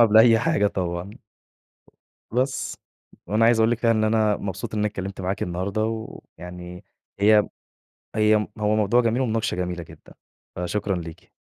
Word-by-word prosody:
قبل 110 Hz, -2 st, +6 dB
أي 115 Hz, 0 st, +7 dB
حاجة 155 Hz, -5 st, +2 dB
طبعًا. 90 Hz, -1 st, -3 dB, 1.2 s
بس. 130 Hz, +3 st, -1 dB, 0.5 s
وأنا 105 Hz, +4 st, +3 dB
عايز 115 Hz, -1 st, +4 dB
أقول 110 Hz, +1 st, +4 dB
لِك 120 Hz, -, +1 dB
كده 115 Hz, -2 st, +3 dB
إن 110 Hz, -1 st, +2 dB
أنا 110 Hz, -1 st, +2 dB
مبسوط 95 Hz, +1 st, -5 dB
إن 105 Hz, -, -1 dB
أنا 105 Hz, -, +2 dB
اتكلمت 95 Hz, -1 st, -6 dB
معاكِ 95 Hz, +2 st, -2 dB
النهارده 95 Hz, +5 st, -2 dB
ويعني 90 Hz, -5 st, -8 dB, 0.4 s
هي 105 Hz, +1 st, +5 dB, 0.7 s
هي 110 Hz, 0 st, +4 dB, 0.2 s
هو 105 Hz, 0 st, +1 dB
موضوع 110 Hz, +3 st, +3 dB
جميل 120 Hz, +2 st, +1 dB
ومناقشة 115 Hz, -3 st, -1 dB
جميلة 90 Hz, -1 st, -3 dB
جدًا، -, -, -16 dB, 0.4 s
فشكرًا 95 Hz, +2 st, -2 dB
ليكِ. 85 Hz, -2 st, -9 dB
105 Hz, 150 wpm, -24 LUFS, 90-115 Hz, 1.2 s, أي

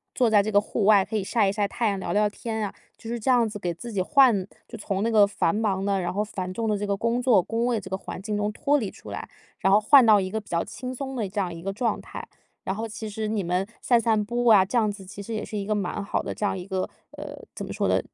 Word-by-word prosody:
坐 245 Hz, -3 st, +3 dB
在 210 Hz, -2 st, +5 dB
这 205 Hz, -, -3 dB
个 205 Hz, -, +6 dB
户 210 Hz, 0 st, -2 dB
外， 205 Hz, -2 st, +6 dB
可 220 Hz, -, -3 dB
以 205 Hz, -, -1 dB
晒 205 Hz, 0 st, +2 dB
一 -, -, +1 dB
晒 205 Hz, 0 st, 0 dB
太 225 Hz, +2 st, 0 dB
阳， 200 Hz, -1 st, -2 dB
聊 175 Hz, -2 st, -3 dB
聊 210 Hz, 0 st, +3 dB
天 220 Hz, +1 st, -4 dB
啊。 200 Hz, -, -6 dB, 0.2 s
就 225 Hz, -, -9 dB
是 235 Hz, 0 st, -3 dB
这 245 Hz, +4 st, +1 dB
样 240 Hz, -3 st, +3 dB
子 205 Hz, -, -6 dB
给 175 Hz, -4 st, -3 dB
自 235 Hz, +8 st, -8 dB
己 200 Hz, -, -2 dB
换 235 Hz, -2 st, +4 dB, 0.2 s
就 230 Hz, -, -9 dB
从 195 Hz, -2 st, -3 dB
那 225 Hz, -, +1 dB
个 215 Hz, -3 st, +6 dB
繁 200 Hz, -3 st, 0 dB
忙 205 Hz, -3 st, 0 dB
的， 200 Hz, -1 st, +1 dB
然 175 Hz, -1 st, -2 dB
后 205 Hz, +2 st, 0 dB
繁 185 Hz, -3 st, -5 dB
重 225 Hz, +2 st, -2 dB
的 210 Hz, -, +1 dB
这 205 Hz, -, -3 dB
个 200 Hz, -1 st, 0 dB
工 230 Hz, +4 st, 0 dB
作、 245 Hz, -6 st, +4 dB
工 225 Hz, +5 st, -2 dB
位 240 Hz, -2 st, +1 dB
这 190 Hz, -, -10 dB
个 190 Hz, -, -2 dB
环 190 Hz, -, -8 dB
境 210 Hz, +1 st, -3 dB
中 210 Hz, 0 st, -1 dB
脱 290 Hz, +6 st, +2 dB
离 215 Hz, -8 st, -3 dB
出 -, -, -13 dB
来， -, -, -6 dB, 0.3 s
然 195 Hz, -, +2 dB
后 210 Hz, -, +6 dB
换 260 Hz, +4 st, +7 dB
到 215 Hz, -3 st, +6 dB
一 185 Hz, -, -3 dB
个 220 Hz, -, -2 dB
比 210 Hz, -, -17 dB
较 170 Hz, -1 st, 0 dB
轻 255 Hz, 0 st, -7 dB
松 265 Hz, +1 st, -5 dB
的 225 Hz, -5 st, -2 dB
这 200 Hz, +2 st, -2 dB
样 180 Hz, -2 st, -2 dB
一 165 Hz, 0 st, -9 dB
个 195 Hz, +1 st, -3 dB
状 230 Hz, +3 st, -1 dB
态。 -, -, -8 dB, 0.4 s
然 190 Hz, -, -2 dB
后 225 Hz, +2 st, -3 dB
其 220 Hz, 0 st, -6 dB
实 215 Hz, +1 st, -3 dB
你 210 Hz, -2 st, -1 dB
们 180 Hz, +2 st, 0 dB, 0.2 s
散 240 Hz, -2 st, +4 dB
散 220 Hz, -2 st, +2 dB
步 240 Hz, +3 st, -2 dB
啊， 215 Hz, -5 st, +7 dB
这 200 Hz, +6 st, -2 dB
样 215 Hz, -3 st, +2 dB
子 200 Hz, -1 st, -10 dB
其 190 Hz, +2 st, -11 dB
实 230 Hz, -, -6 dB
也 215 Hz, -1 st, -3 dB
是 215 Hz, -, -5 dB
一 200 Hz, -, -3 dB
个 215 Hz, -, 0 dB
蛮 205 Hz, 0 st, -2 dB
好 -, -, -1 dB
的 -, -, -5 dB
这 210 Hz, -, -2 dB
样 200 Hz, -, 0 dB
一 185 Hz, 0 st, -7 dB
个 190 Hz, -1 st, -2 dB, 0.3 s
呃， -, -, -8 dB
怎 -, -, -5 dB
么 -, -, -6 dB
说 -, -, 0 dB
呢， -, -, +3 dB
210 Hz, 335 characters per minute, -25 LUFS, 195-230 Hz, 0.4 s, 换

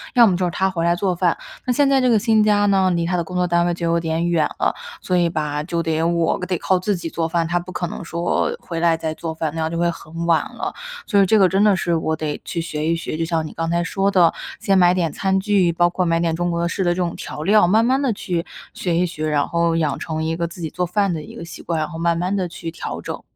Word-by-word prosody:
要 240 Hz, -2 st, +7 dB
么 185 Hz, -, +2 dB
就 185 Hz, -, -1 dB
是 175 Hz, -, -1 dB
他 190 Hz, +3 st, +1 dB
回 170 Hz, -3 st, -2 dB
来 170 Hz, 0 st, +3 dB
做 185 Hz, 0 st, 0 dB
饭。 -, -, +1 dB, 0.3 s
那 255 Hz, -, +1 dB
现 280 Hz, +3 st, +3 dB
在 270 Hz, -1 st, +4 dB
这 255 Hz, -, +3 dB
个 220 Hz, -3 st, +4 dB
新 220 Hz, -1 st, +3 dB
家 205 Hz, -1 st, +3 dB
呢， 190 Hz, -2 st, +3 dB
离 170 Hz, -1 st, 0 dB
他 180 Hz, -, 0 dB
的 170 Hz, -, 0 dB
工 180 Hz, +2 st, -6 dB
作 180 Hz, 0 st, +2 dB
单 170 Hz, 0 st, +2 dB
位 175 Hz, -, +1 dB
就 170 Hz, 0 st, -4 dB
有 170 Hz, 0 st, +2 dB
点 165 Hz, +1 st, -1 dB
远 165 Hz, -3 st, +2 dB
了， -, -, +2 dB, 0.3 s
所 185 Hz, -, -1 dB
以 175 Hz, -1 st, +3 dB
吧， 150 Hz, -2 st, -2 dB
就 170 Hz, +1 st, -2 dB
得 160 Hz, 0 st, 0 dB
我 170 Hz, 0 st, +1 dB
得 180 Hz, -2 st, -1 dB
靠 185 Hz, -, +1 dB
自 195 Hz, +2 st, 0 dB
己 170 Hz, -1 st, -5 dB
做 165 Hz, 0 st, -2 dB
饭， 165 Hz, 0 st, 0 dB
他 175 Hz, +1 st, 0 dB
不 180 Hz, +1 st, -9 dB
可 175 Hz, -1 st, -3 dB
能 -, -, -7 dB
说 170 Hz, +1 st, -1 dB
回 165 Hz, -1 st, -5 dB
来 165 Hz, -1 st, +3 dB
再 160 Hz, -1 st, -3 dB
做 160 Hz, 0 st, -5 dB
饭， 160 Hz, -1 st, -2 dB
那 160 Hz, -, -2 dB
样 160 Hz, +1 st, -1 dB
就 170 Hz, -, -3 dB
会 170 Hz, 0 st, +2 dB
很 165 Hz, 0 st, -6 dB
晚 165 Hz, -2 st, +3 dB
了。 -, -, -4 dB, 0.3 s
所 200 Hz, -3 st, +4 dB
以 -, -, +5 dB
这 215 Hz, +3 st, +4 dB
个 190 Hz, -, +6 dB
真 195 Hz, +3 st, +2 dB
的 210 Hz, -2 st, +5 dB
是 170 Hz, -2 st, 0 dB
我 160 Hz, 0 st, -1 dB
得 155 Hz, -2 st, -4 dB
去 170 Hz, -, -4 dB
学 155 Hz, -2 st, -3 dB
一 165 Hz, -, +2 dB
学， 165 Hz, -, -4 dB
就 165 Hz, -, -1 dB
像 165 Hz, -1 st, -1 dB
你 -, -, -10 dB
刚 165 Hz, 0 st, -2 dB
才 170 Hz, 0 st, +1 dB
说 195 Hz, +3 st, 0 dB
的， 175 Hz, -4 st, +4 dB, 0.3 s
先 195 Hz, -1 st, +2 dB
买 180 Hz, -1 st, +5 dB
点 170 Hz, -3 st, 0 dB
餐 190 Hz, 0 st, +1 dB
具， 190 Hz, -3 st, +2 dB
包 175 Hz, +1 st, +2 dB
括 185 Hz, +1 st, -1 dB
买 165 Hz, -1 st, +1 dB
点 165 Hz, -1 st, 0 dB
中 175 Hz, +1 st, -1 dB
国 170 Hz, 0 st, 0 dB
式 190 Hz, +3 st, -2 dB
的 175 Hz, -, +2 dB
这 -, -, 0 dB
种 175 Hz, -2 st, -2 dB
调 150 Hz, -, -6 dB
料， 210 Hz, +2 st, +5 dB
慢 220 Hz, +5 st, +4 dB
慢 265 Hz, +2 st, +2 dB
地 270 Hz, -4 st, +1 dB
去 175 Hz, -4 st, -3 dB, 0.3 s
学 175 Hz, -3 st, -2 dB
一 180 Hz, -, +3 dB
学， 155 Hz, -2 st, -4 dB
然 145 Hz, -1 st, +1 dB
后 170 Hz, -1 st, +1 dB
养 155 Hz, -4 st, 0 dB
成 160 Hz, 0 st, -3 dB
一 160 Hz, +1 st, -1 dB
个 170 Hz, 0 st, -2 dB
自 170 Hz, +1 st, -11 dB
己 160 Hz, -, -3 dB
做 180 Hz, +2 st, -2 dB
饭 195 Hz, +1 st, 0 dB
的 160 Hz, -, -4 dB
一 -, -, -11 dB
个 -, -, -7 dB
习 165 Hz, -, -10 dB
惯， 170 Hz, -, -2 dB
然 155 Hz, -, -1 dB
后 165 Hz, -, -7 dB
慢 170 Hz, 0 st, +1 dB
慢 180 Hz, +3 st, -1 dB
地 185 Hz, -2 st, -1 dB
去 165 Hz, -1 st, -7 dB
调 -, -, -6 dB
整。 -, -, -6 dB
170 Hz, 320 characters per minute, -21 LUFS, 165-185 Hz, 0.3 s, 要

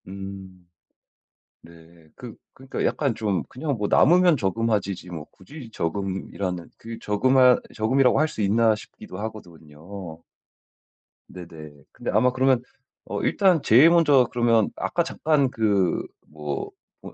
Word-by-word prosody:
음. 95 Hz, -2 st, -10 dB, 1.0 s
네. 85 Hz, -1 st, -18 dB
그 120 Hz, -3 st, -10 dB, 0.2 s
그러니까 135 Hz, +1 st, -5 dB
약간 140 Hz, -6 st, 0 dB
좀 100 Hz, -6 st, -1 dB
'그냥 145 Hz, +3 st, -4 dB
뭐 105 Hz, -2 st, -2 dB
남으면 175 Hz, +1 st, +4 dB
저금하지.'지 100 Hz, -4 st, -2 dB
뭐 80 Hz, -4 st, -7 dB
굳이 120 Hz, +5 st, -12 dB
저금이라는 95 Hz, -1 st, -4 dB
그 115 Hz, 0 st, -9 dB
저금할 125 Hz, +4 st, +3 dB
저금이라고 125 Hz, +4 st, +2 dB
할 155 Hz, -, +2 dB
수 110 Hz, -, -5 dB
있나 110 Hz, +2 st, +3 dB
싶기도 90 Hz, -3 st, -12 dB
하거든요. 85 Hz, -4 st, -9 dB, 1.1 s
네네. 80 Hz, -4 st, -11 dB, 0.2 s
근데 -, -, -5 dB
아마 125 Hz, -, +3 dB
그러면 130 Hz, -1 st, +2 dB, 0.4 s
어 -, -, -4 dB
일단 185 Hz, -6 st, +2 dB
제일 130 Hz, +8 st, +6 dB
먼저 150 Hz, -7 st, +4 dB
그러면 115 Hz, -3 st, +2 dB
아까 170 Hz, -, -1 dB
잠깐 150 Hz, -4 st, 0 dB
그 100 Hz, -6 st, 0 dB, 0.3 s
뭐 75 Hz, -2 st, -5 dB, 0.3 s
뭐 -, -, -11 dB
110 Hz, 265 characters per minute, -24 LUFS, 90-130 Hz, 1.1 s, 제일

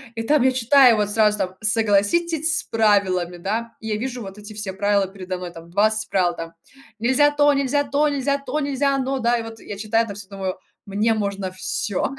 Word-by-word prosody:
и 225 Hz, -, -3 dB
там 295 Hz, +4 st, +3 dB
я 260 Hz, -, +4 dB
читаю 255 Hz, 0 st, +5 dB
вот 210 Hz, -1 st, 0 dB
сразу 210 Hz, -1 st, +3 dB
там: 185 Hz, -2 st, -3 dB
"Согласитесь 225 Hz, +10 st, +1 dB
с -, -, -6 dB
правилами". 195 Hz, -5 st, +1 dB
Да, 220 Hz, +6 st, -3 dB
я 220 Hz, -1 st, -2 dB
вижу 245 Hz, +1 st, -4 dB
вот 195 Hz, 0 st, -9 dB
эти 210 Hz, +1 st, -10 dB
все 205 Hz, -2 st, -5 dB
правила 200 Hz, 0 st, +1 dB
передо 185 Hz, -1 st, -6 dB
мной, 180 Hz, -1 st, -7 dB
там 165 Hz, 0 st, -12 dB
20 215 Hz, +4 st, +1 dB
правил, 175 Hz, -3 st, +1 dB
там 165 Hz, 0 st, -7 dB, 0.5 s
нельзя 260 Hz, +5 st, +4 dB
то, 290 Hz, 0 st, +4 dB
нельзя 280 Hz, +1 st, +1 dB
то, 285 Hz, +2 st, +1 dB
нельзя 280 Hz, 0 st, 0 dB
то, 280 Hz, +2 st, -3 dB
нельзя 280 Hz, 0 st, 0 dB
оно, 270 Hz, 0 st, -1 dB
да, 240 Hz, 0 st, +2 dB
и 230 Hz, -, -4 dB
вот 225 Hz, 0 st, -9 dB
я 205 Hz, -, -8 dB
читаю 225 Hz, +2 st, +1 dB
это 205 Hz, -3 st, -7 dB
всё, 200 Hz, -1 st, -10 dB
думаю: 190 Hz, -2 st, -4 dB, 0.3 s
"Мне 210 Hz, +3 st, +1 dB
можно 200 Hz, -3 st, -3 dB
всё". 190 Hz, +6 st, -3 dB
220 Hz, 205 wpm, -22 LUFS, 195-260 Hz, 0.5 s, читаю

